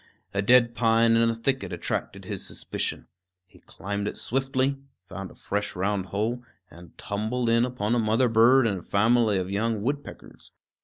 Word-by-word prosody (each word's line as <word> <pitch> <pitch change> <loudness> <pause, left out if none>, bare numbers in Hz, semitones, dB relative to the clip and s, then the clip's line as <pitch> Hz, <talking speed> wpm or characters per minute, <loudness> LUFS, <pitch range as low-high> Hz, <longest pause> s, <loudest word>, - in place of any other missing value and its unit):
A 100 - 0
dead 120 +2 +5
pine 115 -1 +3
in 115 0 +4
a 115 - -1
thicket 115 -4 -1
attracted 85 - -4
his - - -5
suspicion. - - -4 0.4
He 90 - -21
climbed 100 +1 -5
it - - -5
swiftly, 135 +1 -1 0.3
found 95 +1 -7
a - - -16
fresh 105 +1 -3
round 95 +1 -1
hole, 110 +5 -2 0.3
and 85 +2 -15
tumbled 115 +4 -2
in 115 +1 +4
upon 120 -3 -2
a 120 - +2
mother 115 +3 +2
bird 120 +3 +5
and 100 -4 0
a - - -12
family 110 +2 +2
of 95 0 -3
young 110 +1 -1
woodpeckers. 140 +4 -6
115 Hz, 170 wpm, -26 LUFS, 100-120 Hz, 0.4 s, dead